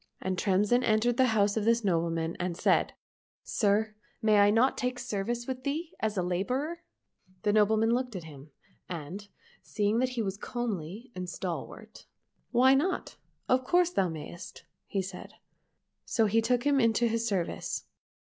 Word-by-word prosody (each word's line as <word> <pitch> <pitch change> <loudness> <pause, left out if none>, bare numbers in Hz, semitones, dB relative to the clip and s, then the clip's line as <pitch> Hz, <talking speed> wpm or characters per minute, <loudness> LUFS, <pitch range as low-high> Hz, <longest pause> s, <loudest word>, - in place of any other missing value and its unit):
And 190 0 -2
Tremsin 205 +6 +2
entered 230 +2 +2
the 260 - +5
house 200 0 +3
of 220 - 0
this 230 +1 +2
nobleman 165 -3 0
and 175 -1 -2
said, - - +2 0.3
" - - -79
Sir, 215 +1 +1 0.3
may 215 -1 +4
I 205 0 +6
not 230 +5 +3
take 250 0 -2
service 235 +3 -3
with 255 0 -5
thee 315 +5 -2
as 220 -1 -1
a 180 - +1
labourer? 255 - -2 0.2
" - - -54
— 185 0 -32
The 205 -1 +2
nobleman 220 +1 +3
looked 250 -2 -1
at 180 - -5
him, 150 -2 -12 0.4
and 180 +4 -6 0.3
seeing 210 +2 0
that 255 0 +2
he - - +2
at - - -1
as 195 0 -3
comely 220 -1 -4
and 180 -1 -5
stalwart, 175 -1 -6 0.2
" - - -46
Why 260 +2 +6
not? 345 +8 0 0.3
Of 255 0 +3
course 355 +5 +3
thou 190 - +1
mayst," 160 +2 -8 0.3
said 190 -2 -4
he. - - -25 0.7
So 225 - +2
he 220 +2 +3
took 240 +1 +1
him 285 -1 +3
into 230 0 +3
his 230 0 0
service. 190 -6 -2
215 Hz, 175 wpm, -29 LUFS, 185-245 Hz, 0.7 s, I